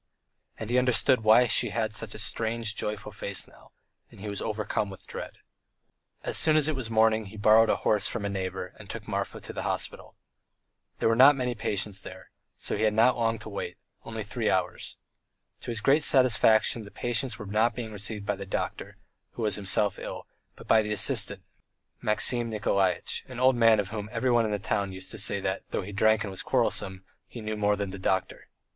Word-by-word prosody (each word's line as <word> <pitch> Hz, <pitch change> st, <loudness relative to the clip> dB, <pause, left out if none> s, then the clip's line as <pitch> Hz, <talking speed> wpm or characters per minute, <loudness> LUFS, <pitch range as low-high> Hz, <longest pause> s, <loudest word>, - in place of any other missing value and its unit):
And 110 Hz, +1 st, -6 dB
he 125 Hz, -, +4 dB
understood 125 Hz, 0 st, +2 dB
why 110 Hz, +3 st, +6 dB
she 120 Hz, 0 st, +2 dB
had 110 Hz, 0 st, -2 dB
such 110 Hz, 0 st, -3 dB
a -, -, -6 dB
strange, 110 Hz, 0 st, -1 dB
joyful 105 Hz, 0 st, -4 dB
face 100 Hz, -1 st, -4 dB
now, -, -, -20 dB, 0.4 s
and -, -, -16 dB
he 105 Hz, -, -7 dB
was 100 Hz, -, -2 dB
overcome 105 Hz, -1 st, -2 dB
with 95 Hz, -, -11 dB
dread. -, -, -7 dB, 0.9 s
As -, -, 0 dB
soon 155 Hz, -1 st, +5 dB
as 155 Hz, -1 st, +3 dB
it 155 Hz, -, 0 dB
was 125 Hz, -4 st, -3 dB
morning 110 Hz, -1 st, +3 dB
he 110 Hz, +3 st, -11 dB
borrowed 110 Hz, +2 st, +5 dB
a -, -, +3 dB
horse 105 Hz, -2 st, +2 dB
from 110 Hz, -4 st, -3 dB
a -, -, 0 dB
neighbour 95 Hz, -2 st, -4 dB
and -, -, -12 dB
took -, -, -7 dB
Marfa -, -, -3 dB
to -, -, -8 dB
the -, -, -4 dB
hospital. -, -, -3 dB, 0.8 s
There -, -, +1 dB
were 115 Hz, -, +3 dB
not 135 Hz, +4 st, +8 dB
many 125 Hz, -2 st, -1 dB
patients 100 Hz, -3 st, -2 dB
there, -, -, -9 dB
and -, -, -26 dB
so -, -, -1 dB
he -, -, -3 dB
had 110 Hz, -1 st, +2 dB
not 115 Hz, +3 st, +4 dB
long 115 Hz, -1 st, 0 dB
to -, -, -6 dB
wait, 100 Hz, -, -5 dB, 0.3 s
only 110 Hz, -1 st, -6 dB
three 110 Hz, +2 st, -2 dB
hours. 95 Hz, -1 st, -2 dB, 0.6 s
To -, -, -9 dB
his 115 Hz, -2 st, -2 dB
great 140 Hz, +6 st, +3 dB
satisfaction 120 Hz, -4 st, +3 dB
the 105 Hz, -, -10 dB
patients 120 Hz, +1 st, -2 dB
were 105 Hz, -, -8 dB
not 110 Hz, +4 st, +1 dB
being 115 Hz, -3 st, -5 dB
received 105 Hz, 0 st, -5 dB
by 105 Hz, -1 st, -1 dB
the 100 Hz, 0 st, -8 dB
doctor, -, -, -4 dB, 0.4 s
who 120 Hz, -, -5 dB
was 105 Hz, -, +1 dB
himself 100 Hz, 0 st, +1 dB
ill, -, -, -7 dB, 0.3 s
but -, -, -14 dB
by 110 Hz, -, +5 dB
the 105 Hz, 0 st, -4 dB
assistant, 105 Hz, -, +1 dB, 0.6 s
Maxim 115 Hz, +2 st, +3 dB
Nikolaitch, 100 Hz, -4 st, 0 dB
an 130 Hz, -2 st, -8 dB
old 130 Hz, 0 st, +4 dB
man 115 Hz, -2 st, +5 dB
of 100 Hz, -2 st, -2 dB
whom 105 Hz, -1 st, -5 dB
everyone 120 Hz, -1 st, +2 dB
in 110 Hz, -, -2 dB
the 105 Hz, -, 0 dB
town 100 Hz, 0 st, -2 dB
used 95 Hz, 0 st, -7 dB
to 110 Hz, -, -6 dB
say 100 Hz, -1 st, +1 dB
that, 95 Hz, 0 st, -2 dB
though -, -, -2 dB
he 100 Hz, -, -8 dB
drank 110 Hz, +2 st, +3 dB
and 100 Hz, -, -5 dB
was 95 Hz, -, -4 dB
quarrelsome, 95 Hz, 0 st, 0 dB, 0.2 s
he 120 Hz, -, -9 dB
knew 110 Hz, -1 st, -4 dB
more 105 Hz, 0 st, +1 dB
than 100 Hz, -2 st, -4 dB
the 100 Hz, -, -8 dB
doctor. 95 Hz, 0 st, -2 dB
110 Hz, 215 wpm, -27 LUFS, 100-115 Hz, 0.9 s, not